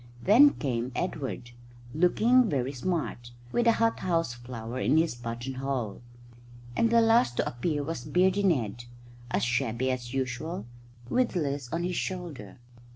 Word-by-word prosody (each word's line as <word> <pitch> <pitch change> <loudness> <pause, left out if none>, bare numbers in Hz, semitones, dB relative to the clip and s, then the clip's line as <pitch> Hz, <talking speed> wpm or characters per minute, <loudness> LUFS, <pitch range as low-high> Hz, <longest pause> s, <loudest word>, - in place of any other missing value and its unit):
Then 270 +9 +7
came 125 -3 -2
Edward, 130 -8 -3 0.4
looking 220 +9 +4
very 135 -2 -1
smart, 135 -4 -3 0.2
with 240 0 +1
a 230 - +6
hot 230 0 +1
house 165 -8 0
flower 120 0 -7
in 155 - +3
his 160 -3 +2
button 120 +2 -5
hole; 130 -6 -3 0.7
and 230 - +3
the 230 0 +5
last 225 - +3
to - - +1
appear 145 +4 -2
was 150 -4 -4
Beardy 185 +6 +2
Ned, 120 - 0 0.4
as - - 0
shabby 120 +1 0
as 120 -1 -4
usual, 130 0 -3 0.4
with 250 - +1
Liz 140 -6 -2
on 170 +1 -1
his 180 0 -2
shoulder. 170 - -5
140 Hz, 150 wpm, -28 LUFS, 120-180 Hz, 0.7 s, Then